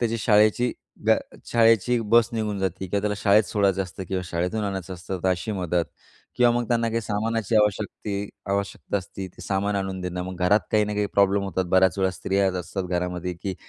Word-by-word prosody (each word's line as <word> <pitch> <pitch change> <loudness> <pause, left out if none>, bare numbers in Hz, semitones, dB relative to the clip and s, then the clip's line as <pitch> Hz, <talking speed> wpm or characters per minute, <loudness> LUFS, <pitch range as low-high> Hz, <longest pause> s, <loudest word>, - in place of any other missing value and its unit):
त्याची 115 -1 0
शाळेची 110 +3 +3 0.3
ब्या - - +5 0.3
शाळेची 115 +1 +4
बस 115 0 +5
निघून 110 -3 -2
जाते 95 0 -2
किंवा 100 +3 -1
त्याला 105 0 -1
शाळेत 105 +1 +5
सोडायचं 100 0 +1
असतं 95 +1 -8
किंवा 95 -1 -1
शाळेतून 90 +5 -2
आणायचं 95 -2 -4
असतं, 90 +2 -5
तर 95 - +2
अशी 95 +4 -1
मदत. 90 -3 0 0.5
किंवा 120 -1 +5
मग 120 0 0
त्यांना 115 -1 +1
काही 115 +1 -1
सामानाची 110 0 -1
आवश्यकती 105 -1 0 0.2
आवश्यकता 100 +1 -2
असते, 95 +1 -7
ते - - -14
सामान 100 +1 -1
आणून 95 -1 -3
देणं 90 0 -3
मग 95 0 -6
घरात 105 +4 +5
काही 105 -1 +4
ना 105 - -3
काही 105 0 0
प्रॉब्लेम 100 0 +3
होतात. 95 -1 -1
बऱ्याच 95 0 +3
वेळा 95 -1 +2
स्त्रियाच 95 0 0
असतात 95 0 -4
घरामध्ये, 90 0 -2
की 95 +3 -5
100 Hz, 195 wpm, -24 LUFS, 95-105 Hz, 0.5 s, ब्या